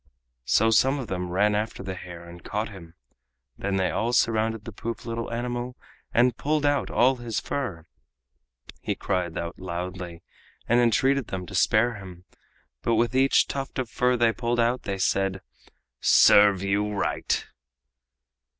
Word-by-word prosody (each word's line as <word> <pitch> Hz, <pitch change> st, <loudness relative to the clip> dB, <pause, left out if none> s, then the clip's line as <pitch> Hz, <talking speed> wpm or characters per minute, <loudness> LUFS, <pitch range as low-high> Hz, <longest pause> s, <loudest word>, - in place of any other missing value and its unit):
So 110 Hz, -, +3 dB
some 135 Hz, +5 st, +4 dB
of 130 Hz, -5 st, -6 dB
them 90 Hz, -1 st, -3 dB
ran 100 Hz, +4 st, +2 dB
after 105 Hz, -1 st, -2 dB
the 95 Hz, -1 st, -4 dB
hare 85 Hz, -2 st, -10 dB
and 85 Hz, 0 st, -12 dB
caught 105 Hz, +3 st, -3 dB
him. 85 Hz, -5 st, -12 dB, 0.6 s
Then 100 Hz, 0 st, -2 dB
they 95 Hz, -1 st, +1 dB
all 120 Hz, +2 st, -1 dB
surrounded 110 Hz, -2 st, +1 dB
the 115 Hz, -, -6 dB
poor 115 Hz, +3 st, -5 dB
little 115 Hz, -1 st, -4 dB
animal 120 Hz, +1 st, -4 dB, 0.3 s
and 120 Hz, 0 st, +3 dB
pulled 150 Hz, +2 st, 0 dB
out 145 Hz, -1 st, +1 dB
all 130 Hz, +2 st, +3 dB
his 120 Hz, -3 st, -3 dB
fur. 100 Hz, -, -4 dB, 1.0 s
He -, -, -2 dB
cried 90 Hz, -4 st, -2 dB
out 85 Hz, +1 st, -5 dB
loudly 90 Hz, -1 st, -6 dB, 0.4 s
and 120 Hz, +1 st, +4 dB
entreated 125 Hz, +3 st, +2 dB
them 95 Hz, -1 st, -5 dB
to 100 Hz, -, -11 dB
spare 110 Hz, +3 st, +2 dB
him, 90 Hz, -2 st, -11 dB, 0.6 s
but 115 Hz, -, +1 dB
with 115 Hz, +2 st, +1 dB
each 135 Hz, +1 st, +4 dB
tuft 135 Hz, 0 st, -5 dB
of 125 Hz, -4 st, -3 dB
fur 125 Hz, 0 st, +2 dB
they 115 Hz, -1 st, +3 dB
pulled 120 Hz, +1 st, -1 dB
out 120 Hz, +2 st, +2 dB
they 100 Hz, -1 st, -2 dB
said: 95 Hz, 0 st, 0 dB, 0.6 s
"Serve 100 Hz, -2 st, +6 dB
you 100 Hz, +1 st, 0 dB
right!" 100 Hz, -, -1 dB
110 Hz, 160 wpm, -26 LUFS, 95-120 Hz, 1.0 s, Serve